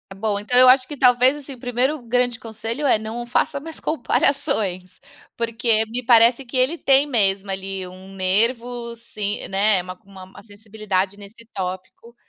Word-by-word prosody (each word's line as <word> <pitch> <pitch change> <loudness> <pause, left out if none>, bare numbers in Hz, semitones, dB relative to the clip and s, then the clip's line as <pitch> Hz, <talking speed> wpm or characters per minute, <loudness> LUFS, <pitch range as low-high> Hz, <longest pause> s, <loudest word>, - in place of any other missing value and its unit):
Bom, 205 0 -2
então 245 +4 0
eu 255 0 +8
acho 255 0 +5
que 295 - -7
talvez, 250 +1 +4
assim, 285 -1 -9
o - - -19
primeiro 250 +5 -1
grande 245 0 0
conselho 225 +5 -5
é, 250 -5 +3
não 225 +2 -6
faça 265 +4 0
mais 320 +2 -9
comparações. 240 - -1 0.4
Porque 230 -1 +1
me 240 +2 -4
parece 235 +2 +5
que 240 - -9
ele 260 +7 +2
tem 275 -1 +3
mesmo, 200 -6 0
ali, 190 -1 -5
um 185 +1 -13
nervo 235 +5 -1
se 210 -3 -5
né, 195 0 +2
uma 185 +1 -8
uma 190 -1 -14
sensibilidade 205 -2 -4
nesse 205 +3 -14
tópico. 185 +4 -7
230 Hz, 160 wpm, -21 LUFS, 195-250 Hz, 0.4 s, eu